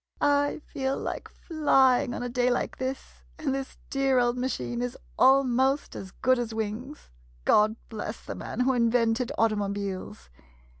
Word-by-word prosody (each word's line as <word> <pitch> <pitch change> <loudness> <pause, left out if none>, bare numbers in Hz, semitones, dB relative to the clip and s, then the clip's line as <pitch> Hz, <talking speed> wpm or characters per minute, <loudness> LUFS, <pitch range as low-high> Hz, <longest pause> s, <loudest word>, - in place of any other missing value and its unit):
I 285 +1 +2
feel 265 0 -2
like - - -5
flying 265 -7 +2
on - - -4
a - - -2
day 245 0 +1
like 245 - -1
this, 260 +1 -5 0.2
and 295 -4 -1
this 270 0 -5
dear 270 -1 +2
old 240 0 +3
machine 125 - -2
is 125 0 -3 0.2
almost 265 +1 +3
as 190 - -7
good 255 +6 +1
as 230 -2 -3
wings! 220 - -5 0.3
God 215 +1 +4
bless 220 0 -6
the - - -5
man 240 - -4
who 260 +1 +3
invented 235 +1 +2
automo 210 -3 +1
biles. 190 - -5
245 Hz, 155 wpm, -27 LUFS, 220-265 Hz, 0.3 s, God